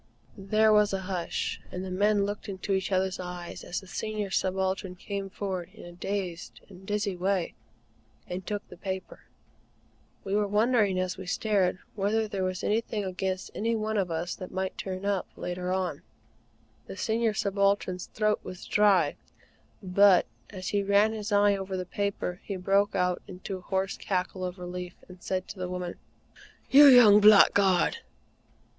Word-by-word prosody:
There 215 +2 +3
was 210 -1 +4
a 195 - -1
hush, 180 -3 -3
and 185 +1 -5
the 185 - -6
men 205 +2 +2
looked 205 0 -5
into 195 0 -3
each 190 0 -1
other's 190 0 0
eyes 180 -1 -7
as 175 - -3
the - - -14
Senior 210 +1 -4
Subaltern 190 0 -1
came 195 +1 -5
forward 185 -3 -4
in - - -11
a 175 - -10
dazed 180 -1 -5
and 190 0 -14
dizzy 205 -2 -1
way, 185 0 -1 0.7
and 180 +1 -5
took 205 +2 -4
the 180 - -13
paper. 190 0 -6 1.0
We 195 - -4
were 205 0 +2
wondering 210 -2 +2
as 185 0 -2
we 190 - -8
stared, 190 -2 +1 0.2
whether 215 +2 0
there 195 -2 -3
was 185 0 -2
anything 215 -1 -1
against 185 0 -3
any 230 +2 -1
one 220 0 -2
of 195 -4 0
us 165 +2 -2
that 185 - -7
might 190 0 -3
turn 190 0 -5
up 200 -2 0
later 180 0 -4
on. 185 -1 -2 0.9
The - - -8
Senior 225 -1 0
Subaltern's 200 -2 0
throat 215 -1 0
was 185 - -9
dry; 195 -8 +3 0.7
but, 190 0 +5 0.2
as 185 0 -6
he 205 - +1
ran 200 +2 +3
his 215 0 -5
eye 205 0 +4
over 190 -1 -4
the 185 - -3
paper, 195 -1 -3
he 200 - -4
broke 195 +2 +1
out 180 -1 +1
into 190 +1 -6
a - - -12
hoarse 190 +1 -2
cackle 185 -1 -2
of 180 +1 -5
relief, 180 0 -6
and 180 -1 -14
said 185 -1 -3
to 195 - -8
the 180 0 -3
woman: 180 -1 -4 0.8
"You 285 +2 +9
young 235 -6 +8
blackguard!" 200 - +5
195 Hz, 170 wpm, -28 LUFS, 185-205 Hz, 1.0 s, You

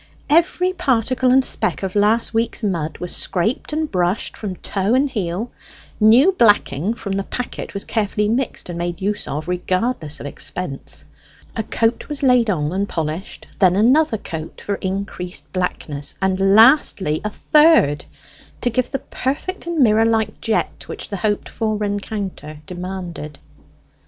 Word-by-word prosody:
Every 360 +3 +3
particle 255 -6 +1
and 260 +1 +5
speck - - -1
of 190 -1 -2
last 215 +3 +2
week's 225 +1 0
mud 165 -6 -1
was 180 - -3
scraped 190 - -1
and 310 0 -2
brushed 180 +1 0
from 200 -4 -5
toe 200 +5 -1
and 275 +2 +3
heel; 210 -2 -3 0.5
new 235 - +6
blacking 210 - +2
from 200 - -6
the 195 0 -1
packet 250 -1 -5
was 200 - -1
carefully 210 -1 0
mixed 240 +3 -1
and 175 -1 -5
made 175 0 -3
use 205 +1 -2
of, 150 +2 -4
regardless 180 - -1
of - - -8
expense. 145 0 -5 0.5
A 225 - 0
coat 225 +4 -1
was 295 -1 -4
laid 250 -4 +4
on 150 -6 0
and 195 +2 -1
polished; 160 +3 -4
then 185 -2 +5
another 250 +5 +4
coat 160 -5 -7
for 205 - -3
increased 190 -1 -5
blackness; 150 -6 -3
and 190 0 0 0.2
lastly 220 - +5
a 210 - -1
third, 295 - +4 0.6
to 245 - +1
give 245 +2 0
the - - -1
perfect 285 +9 -4
and 340 -1 -2
mirror 220 -1 +4
like 220 -2 0
jet 220 -1 -1
which - - -7
the 200 - -3
hoped 205 +2 -1
for 215 -2 -2
rencounter 200 -6 -4
demanded. 175 -5 -6
205 Hz, 155 wpm, -20 LUFS, 180-240 Hz, 0.6 s, new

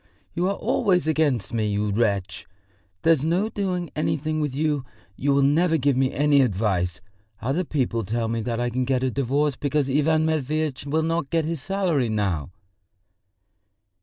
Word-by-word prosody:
"You 175 +2 0
are 200 - 0
always 180 -5 +1
against 145 - +1
me, 110 -2 0
you 105 0 0
wretch! 100 -3 -1 0.6
There's 160 -4 +4
no 180 +7 +1
doing 185 -5 -3
anything 155 +1 -1
with 145 -3 -2
you, 150 -2 0 0.3
you 140 +6 0
will 140 0 +3
never 160 +4 +3
give 140 -1 +2
me 130 0 +2
any 145 0 +3
advice! 95 -6 0 0.4
Other 135 +10 -1
people 125 -7 -1
tell 115 +3 -2
me 115 0 -1
that 115 +1 -2
I 120 0 -1
can 130 +2 0
get 130 0 0
a 130 - +1
divorce 140 +2 0
because 145 -1 -1
Ivan 155 +3 +2
Matveitch 155 -2 -1
will 155 +3 +1
not 165 -3 -1
get 165 -2 +1
his 165 -3 -3
salary 175 - 0
now." 95 -9 -1
140 Hz, 165 wpm, -24 LUFS, 120-160 Hz, 0.6 s, There's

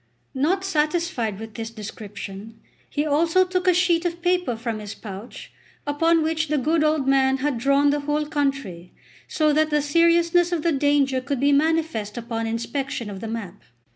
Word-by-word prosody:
Not 325 +8 +1
satisfied 305 - -1
with 220 0 -8
this 225 0 -5
description, 210 -1 -9 0.3
he 295 +1 -1
also 325 +5 +3
took 365 0 -2
a 365 - +6
sheet 350 -2 +2
of 345 -1 -3
paper 360 -8 +1
from 225 -1 -4
his 210 -1 -7
pouch, 205 +2 -9 0.3
upon 325 +3 +2
which 320 0 0
the 300 0 0
good 310 +4 +1
old 305 -3 +1
man 265 0 +3
had 270 -2 -1
drawn 280 +3 +3
the 290 - 0
whole 295 +1 -1
country, 275 - -3 0.3
so 305 -1 +1
that 310 +1 +2
the 300 -1 +2
seriousness 335 +3 +3
of 335 -3 -1
the 335 - +2
danger 280 -2 +2
could 280 0 -3
be 285 +2 +3
manifest 305 -8 0
upon 225 -1 -3
inspection 230 0 -3
of 195 - -7
the 225 - -6
map. 210 -4 -6
285 Hz, 175 wpm, -23 LUFS, 230-325 Hz, 0.3 s, a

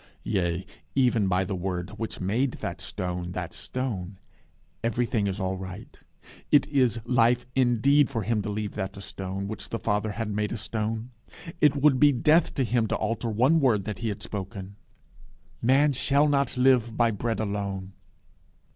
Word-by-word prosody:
Yea 90 -3 -1 0.3
even 120 -6 +3
by 95 0 +2
the 100 - -3
word 90 0 -3
which 115 - -5
made 115 +8 0
that - - -5
stone 90 -1 -4
that 90 -2 -5
stone. 105 -8 -4 0.7
Everything 115 -2 0
is 95 +1 -3
all 95 0 -1
right. 95 -1 -9 0.5
It 145 -2 +6
is 125 -5 +2
life 120 0 +3
indeed 130 +3 +4
for 115 - -2
him 110 +1 0
to 105 - -4
leave 105 0 -3
that 95 -1 -4
a - - -7
stone, 95 0 -4
which 110 - -6
the 115 - -2
Father 105 -1 -1
had 110 -1 -3
made 105 +1 -1
a 115 - -2
stone. 110 +2 -3 0.5
It 150 -3 +5
would 140 -2 +4
be 145 -1 +7
death 150 +6 +3
to 135 - +1
him 120 -2 +1
to - - 0
alter 115 +2 -2
one 130 +9 +3
word 115 -9 +2
that 105 -3 -4
He 115 - -2
had 100 - -5
spoken. 100 -1 -6 0.9
"Man 140 +4 +4
shall 140 +3 +3
not 140 -3 +1
live 125 -3 +3
by 115 -1 +4
bread 110 +1 -2
alone." 100 -2 -3
110 Hz, 175 wpm, -27 LUFS, 100-125 Hz, 0.9 s, be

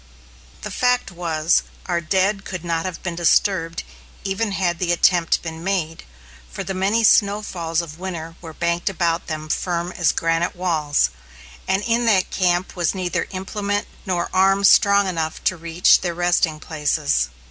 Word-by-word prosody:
The - - -5
fact 250 -3 +1
was, 165 -2 +1 0.2
our 175 -2 -1
dead 195 +4 0
could 180 -3 -6
not 165 0 -1
have 185 -2 -6
been 175 - -3
disturbed 170 0 +1 0.4
even 200 +2 -2
had 175 -3 -1
the 175 -2 0
attempt 175 -1 +2
been 165 -1 -6
made, 175 -4 -2 0.4
for - - -6
the 195 - -4
many 200 +5 +1
snowfalls 200 -6 +2
of 160 0 -10
winter 165 -3 -6
were 165 -2 -8
banked 170 +3 -1
about 170 -2 -1
them 155 -1 -5
firm 175 +2 -2
as 175 -3 +1
granite 165 +2 0
walls, 155 - +1 0.6
and 195 +2 +1
in 235 +1 +1
that 190 -5 +2
camp 180 -1 0
was 175 +1 0
neither 180 -2 -2
implement 205 +2 -3 0.2
nor 175 -2 0
arm 195 +1 +3
strong 200 0 +5
enough 160 -3 -3
to 185 - +1
reach 170 +1 +3
their 175 -2 -3
resting 175 -3 +1
places. 150 - 0
175 Hz, 160 wpm, -21 LUFS, 165-195 Hz, 0.6 s, strong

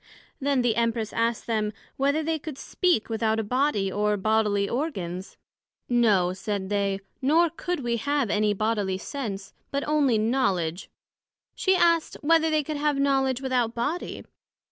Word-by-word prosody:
Then 275 -2 +1
the 235 -2 +1
Empress 230 -2 0
asked 230 0 0
them, 215 -2 -1 0.2
Whether 280 +3 +1
they 320 0 -1
could 295 -2 -7
speak 355 - 0
without 220 -1 0
a - - 0
body, 220 -4 0
or 210 +1 +1
bodily 210 -1 +1
organs? 190 - -4 0.5
No, 210 -7 +3
said 190 0 -4
they; 200 -1 0 0.2
nor 320 +5 +3
could 350 -1 -3
we 235 -2 -1
have 285 -2 0
any 210 0 +2
bodily 205 -3 0
sense, 200 -4 -5 0.2
but 280 0 -2
onely 290 -6 +3
knowledg. 200 -7 0 0.7
she 380 -1 +2
asked, 335 -2 +2
Whether 320 +1 +4
they 310 -1 +2
could 300 +1 -4
have 295 0 +1
Knowledg 270 -2 +1
without 250 -3 0
Body? 290 +9 -3
235 Hz, 150 wpm, -26 LUFS, 210-285 Hz, 0.7 s, Whether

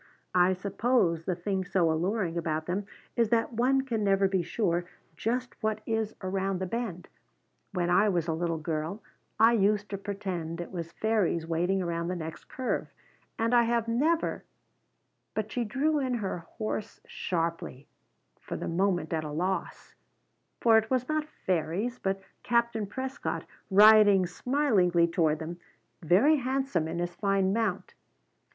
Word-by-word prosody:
"I 180 +1 +4
suppose 190 -3 +1
the 185 - 0
thing 190 +2 -2
so 180 -3 +2
alluring 175 +2 -1
about 160 -2 -2
them 195 +3 -2 0.3
is 230 -2 +2
that 230 +1 +1
one 255 +4 +3
can 235 -5 -2
never 195 -1 +3
be 190 -1 +1
sure 175 -1 -1 0.3
just 250 +3 -3
what 220 -1 -1
is 220 -1 -1
around 190 0 -1
the 190 - -2
bend. 190 -3 -4 0.7
When 175 -2 0
I 205 +4 +5
was 175 -4 0
a 165 - 0
little 165 0 -1
girl 160 +5 -3 0.4
I 225 +2 +6
used 205 -1 +2
to 200 - -4
pretend 185 -5 -4
it 175 - -6
was 170 -3 -5
fairies 205 -7 0
waiting 175 +4 0
around 170 -1 -2
the 180 - -2
next 160 -2 -7
curve, 260 -1 -2 0.5
and 230 +2 +1
I 240 - +7
have 235 -1 +1
never 300 +9 +1 0.4
" - - -49
But 215 0 -2
she 245 - -1
drew 290 +8 +1
in 260 -3 0
her 195 -6 -3
horse 215 +5 -5
sharply, 165 -6 -3 0.5
for - - -6
the - - -4
moment 175 -1 0
at 160 -1 -1
a 150 - -5
loss; 180 +6 -3 0.7
for 225 -2 +6
it 220 - -6
was 255 -1 0
not 310 0 -1 0.2
fairies, 185 +8 -1
but 195 0 -1 0.2
Captain 235 -3 +1
Prescott, 265 +6 -4 0.2
riding 205 -1 +7
smilingly 180 - +2
toward 165 -3 +1
them, 170 +2 -6 0.4
very 200 - +4
handsome 260 - -1
on 160 - -4
his 175 0 -2
fine 195 0 +1
mount. 220 -4 -1
195 Hz, 160 wpm, -29 LUFS, 175-230 Hz, 0.7 s, I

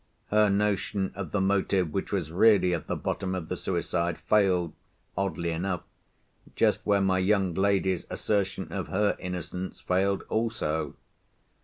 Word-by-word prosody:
Her 105 0 +5
notion 100 -1 0
of 100 -2 -6
the 105 - +1
motive 95 -3 +1
which 95 - -2
was 90 -6 -1
really 95 0 +5
at 85 - -3
the - - -1
bottom 95 0 -2
of 85 -4 -5
the 90 - -1
suicide 85 -2 -1
failed, 95 -6 +2 0.4
oddly 90 -3 -1
enough, 90 +1 -2 0.7
just - - +2
where 100 -1 +4
my 95 -1 +2
young 95 -1 +2
lady's 95 -1 +1
assertion 100 -2 -1
of - - -3
her 105 +2 +1
innocence 90 0 -5
failed 95 +2 +1
also. 95 -10 -1
95 Hz, 145 wpm, -28 LUFS, 90-100 Hz, 0.7 s, Her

